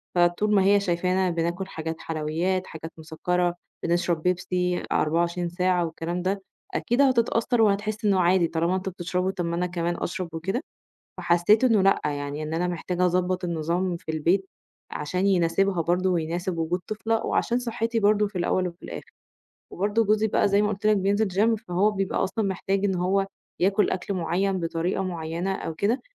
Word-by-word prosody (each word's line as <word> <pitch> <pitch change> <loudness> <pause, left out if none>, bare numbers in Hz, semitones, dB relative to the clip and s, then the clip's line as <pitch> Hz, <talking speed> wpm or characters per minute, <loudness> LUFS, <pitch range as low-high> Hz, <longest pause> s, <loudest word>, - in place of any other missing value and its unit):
فطول 175 +5 +3
ما 195 - +5
هي 200 +1 +5
شايفانا 185 0 +1
بناكل 170 +2 -2
حاجات 160 -3 -4
حلويات، 165 +4 -1
حاجات 160 0 -8
مسكّرة، 175 +2 -1 0.3
بنشرب 170 -1 0
بيبسي 180 0 0
24 170 +2 +1
ساعة 180 0 +1
والكلام 165 +2 -4
ده، 195 +2 -1 0.3
أكيد 240 +4 +1
هتتأثّر 240 -2 +2
وهتحس 215 0 +1
إنه 195 -2 +3
عادي، 175 -1 +4
طالما 170 +3 0
أنتم 190 0 -3
بتشربوا 180 +1 -2
طَب 175 -2 -3
ما 170 0 -1
أنا 180 +1 0
كمان 175 0 -2
أشرب 185 -1 -3
وكده 190 +9 -2 0.6
فحسّيت 175 +7 +3
إنّه 225 -6 +4
لأ، 195 +1 +4
يعني 145 0 -3
إن 155 +1 -4
أنا 175 +2 0
محتاجة 180 +1 -1
أضبّط 180 +1 0
النظام 170 +2 -1
في 160 -1 -6
البيت، 175 +5 +1 0.4
علشان 180 +6 -2
يناسبها 180 0 +2
برضه 180 +3 +1
ويناسب 175 +1 -1
وجود 165 +3 -1
طفلة، 220 +1 -1
وعشان 240 - +1
صحّتي 230 -1 -1
برضه 210 0 +3
في 200 -2 -5
الأول 180 +1 +1
وفي 175 0 -13
الآخر، - - -8 0.6
وبرضه 205 +4 +1
جوزي 215 +1 +2
بقى 205 - +2
زي 200 +1 +3
ما 210 - +1
قُلت 205 0 -5
لك 215 - +4
بينزل 200 +3 +1
gym 220 +3 +2
فهو 185 +4 +2
بيبقى 195 -2 -1
أصلًا 205 +3 -1
محتاج 195 +1 -1
إن 190 -2 +1
هو 190 +2 +1 0.3
ياكل 195 +3 +3
أكل 190 +2 -2
معيّن 185 +2 0
بطريقة 170 +3 -1
معيّنة، 170 +1 -3
أو 165 - -4
كده 220 +9 0
180 Hz, 170 wpm, -25 LUFS, 170-200 Hz, 0.6 s, ما